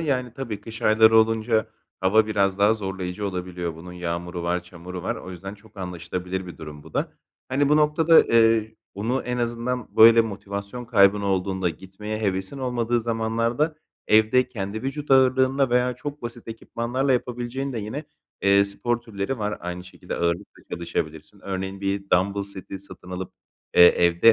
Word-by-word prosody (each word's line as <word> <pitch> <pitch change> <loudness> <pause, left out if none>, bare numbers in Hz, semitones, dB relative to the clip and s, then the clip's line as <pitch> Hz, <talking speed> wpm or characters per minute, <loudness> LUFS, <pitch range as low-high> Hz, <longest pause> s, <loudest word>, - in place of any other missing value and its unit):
Yani, 130 -6 -1
tabii 115 -7 -5
kış 110 +2 -9
ayları 110 +1 +6
olunca 110 0 +2 0.3
hava 105 +4 +4
biraz 100 -2 +1
daha 105 +2 +5
zorlayıcı 95 -1 -4
olabiliyor, 90 -3 -4
bunun 90 +2 -10
yağmuru 85 0 -4
var, 90 +1 -1
çamuru 90 0 -9
var. - - -2
O 95 - -9
yüzden 95 +3 -7
çok 105 +1 -21
anlaşılabilir 90 0 -4
bir 90 - -10
durum 75 -2 -9
bu 80 - -15
da. - - -1 0.4
Hani, 140 +2 +2
bu 150 - +5
noktada, 155 +2 +3
ııı, 115 -1 +4 0.3
bunu 115 +7 -1
en 125 0 -3
azından, 120 +1 -3
böyle 115 +1 +9
motivasyon 100 +2 -5
kaybın 100 -3 +4
olduğunda, 95 -1 0
gitmeye 95 +5 -6
hevesin 95 +4 -2
olmadığı 120 -2 0
zamanlarda 115 +6 0 0.3
evde 110 +4 +4
kendi 105 -2 -5
vücut 140 +2 -4
ağırlığınla 130 0 +4
veya 125 +1 +2
çok 145 +3 -7
basit 120 0 -8
ekipmanlarla 120 +4 -2
yapabileceğin 125 +2 -2
de 115 - -3
yine, 110 +9 -5 0.4
eee, 100 0 +5
spor 120 +4 -2
türleri 115 +2 -4
var 105 0 -2
aynı 90 0 -5
şekilde. 90 - -8
Ağırlıkla 85 +3 -2
çalışabilirsin. 85 +2 -4
Örneğin, 95 0 -4
bir 100 0 -2
dambıl 100 +2 +2
seti 95 -1 -7
satın 95 -2 -12
alıp, 90 0 -5 0.4
eee, - - +9
evde 85 +7 +5
105 Hz, 160 wpm, -24 LUFS, 95-120 Hz, 0.4 s, böyle